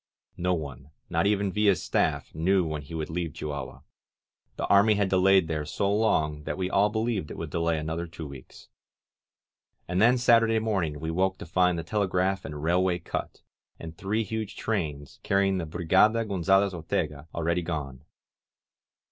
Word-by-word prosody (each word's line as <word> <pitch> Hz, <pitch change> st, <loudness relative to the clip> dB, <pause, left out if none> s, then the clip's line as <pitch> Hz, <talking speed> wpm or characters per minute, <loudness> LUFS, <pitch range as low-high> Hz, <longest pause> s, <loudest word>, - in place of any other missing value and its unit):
No 90 Hz, 0 st, +1 dB
one, 70 Hz, -3 st, -7 dB, 0.2 s
not -, -, +2 dB
even 100 Hz, -1 st, +1 dB
Villa's 105 Hz, -3 st, +2 dB
staff, -, -, 0 dB
knew 90 Hz, +3 st, +2 dB
when 80 Hz, -2 st, -3 dB
he 75 Hz, +4 st, -9 dB
would 80 Hz, 0 st, -4 dB
leave 85 Hz, -2 st, -3 dB
Chihuahua; 70 Hz, -2 st, -6 dB, 0.7 s
the -, -, -2 dB
army 105 Hz, +2 st, +5 dB
had 100 Hz, -1 st, +1 dB
delayed 95 Hz, -1 st, +4 dB
there 75 Hz, -1 st, -2 dB
so 100 Hz, +6 st, -1 dB
long 75 Hz, -9 st, +1 dB
that -, -, -3 dB
we 95 Hz, -1 st, -2 dB
all 100 Hz, +2 st, +3 dB
believed 110 Hz, -6 st, -2 dB
it -, -, -8 dB
would -, -, -6 dB
delay 85 Hz, -1 st, 0 dB
another 80 Hz, +2 st, -3 dB
two 80 Hz, -1 st, -8 dB
weeks. 70 Hz, -3 st, -12 dB, 1.2 s
And 90 Hz, +2 st, 0 dB
then 120 Hz, +3 st, +5 dB
Saturday 115 Hz, -2 st, +4 dB
morning 95 Hz, -9 st, -1 dB
we 80 Hz, +2 st, -3 dB
woke 95 Hz, +2 st, 0 dB
to -, -, -8 dB
find 90 Hz, +1 st, +2 dB
the 85 Hz, -, -3 dB
telegraph 95 Hz, -2 st, 0 dB
and 75 Hz, -1 st, -6 dB
railway 90 Hz, +2 st, +2 dB
cut, -, -, -6 dB, 0.4 s
and 80 Hz, 0 st, -8 dB
three 105 Hz, +6 st, -1 dB
huge 110 Hz, 0 st, -4 dB
trains, 75 Hz, -10 st, -3 dB
carrying 95 Hz, -1 st, +1 dB
the 85 Hz, -, -4 dB
Brigada 95 Hz, +8 st, +3 dB
Gonzalez 95 Hz, 0 st, +2 dB
Ortega, 80 Hz, -3 st, -3 dB
already 85 Hz, +1 st, 0 dB
gone. 70 Hz, -6 st, -5 dB
90 Hz, 165 wpm, -27 LUFS, 80-100 Hz, 1.2 s, army